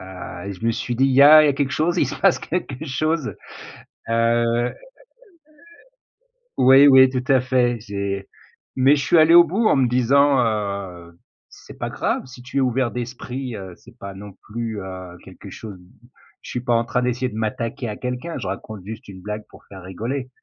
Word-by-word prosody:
heu 95 0 -9
et - - -4
je 100 +4 -10
me - - +3
suis 120 +2 -4
dit: 135 - +3
«Il 135 - +1
y 135 +2 +6
a 155 +2 +9
il - - +3
y - - +3
a - - +3
quelque 140 0 -2
chose, 160 +3 0
il 145 - +2
se - - -5
passe - - +4
quelque 155 -5 -5
chose» 155 +1 -2 0.8
heu 115 +1 +1 1.9
Oui, 135 +2 +7
oui 130 -1 +7
tout 125 -1 -3
à 130 - +4
fait, 125 -2 +1
j'ai 100 -2 -5 0.5
mais 135 +3 +4
je 140 - -2
suis 170 - +4
allé 160 +1 +6
au 175 0 +9
bout 195 +8 -1
en - - +3
me 130 -2 +2
disant: 135 +3 +3
«Heu, 100 -6 -4 0.3
c'est - - -15
pas - - -4
grave - - -2
si 125 -1 -13
tu 135 +2 -4
es - - +3
ouvert 130 -1 0
d'esprit, 125 +1 -6
heu, 95 -3 -9
c'est 120 0 -19
pas 100 -2 -8
non 100 +1 -10
plus, 110 -1 -5
heu, 95 -2 -9
quelque - - -12
chose» 105 -4 -9 0.6
Je - - -10
suis 125 - -3
pas 120 0 0
en 115 0 +2
train 125 +2 -1
d'essayer 125 +1 -1
de 105 - -9
m'attaquer 115 +3 -3
à 105 - -5
quelqu'un, 125 +7 -5
je - - -6
raconte 100 +1 -7
juste 110 +2 -9
une 95 -2 -11
blague 105 +1 -6
pour - - -17
faire 95 -2 -12
rigoler.» 115 +9 -5
120 Hz, 205 wpm, -21 LUFS, 105-135 Hz, 1.9 s, a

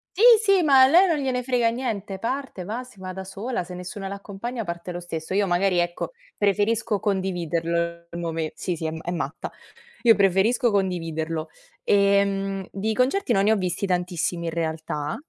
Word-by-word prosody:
Sì, 390 - -2 0.2
sì, 395 -3 +4
ma 275 -5 +6
a 260 - +8
lei 355 +7 +6
non 320 -4 +1
gliene 255 -2 -1
frega 245 -2 +2
niente: 210 -6 -4
parte, 255 -5 -4
va, 225 +6 -4
si 250 -6 -17
va 185 0 -6
da 190 +1 -6
sola, 200 +3 -4
se 180 +1 -10
nessuno 190 +2 -6
l'accompagna 205 +4 -5
parte 170 0 -5
lo 175 - -5
stesso. 165 -1 -5
Io, 200 0 +2
magari, 180 0 +2
ecco, 175 0 -2 0.3
preferisco 210 +1 +1
condividerlo 170 -3 -1
il 170 - -6
mome 165 -2 -3
sì, 180 - -3
sì, 160 0 -3
è - - -2
ma 160 - -6
è 175 - -2
matta. 155 -3 -4 0.5
Io 230 -2 +6
preferisco 200 +5 +3
condividerlo, 165 -5 -2 0.3
ehm, 200 - +2
di 215 +3 -2
concerti 260 +3 +1
non 195 -2 +3
ne 210 - +4
ho - - +5
visti 185 0 -1
tantissimi, 175 -2 -1
in 165 - -2
realtà. 160 -2 -3
195 Hz, 185 wpm, -24 LUFS, 175-225 Hz, 0.5 s, a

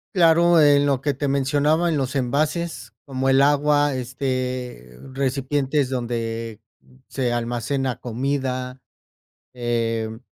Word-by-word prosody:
Claro, 170 -1 +5
en 145 -1 +5
lo 135 -2 +1
que 145 0 0
te 140 +1 -3
mencionaba 145 +5 +1
en 155 - 0
los 135 +1 -2
envases 145 - -1
como 135 -1 -3
el 135 +1 +4
agua, 145 0 +3
este, 125 - -4
recipientes 135 +1 -1
donde 115 -3 -4 0.5
se 125 -3 -1
almacena 120 +2 -2
comida, 130 +1 -3 0.7
em, 115 -2 -2
135 Hz, 110 wpm, -22 LUFS, 120-145 Hz, 0.7 s, Claro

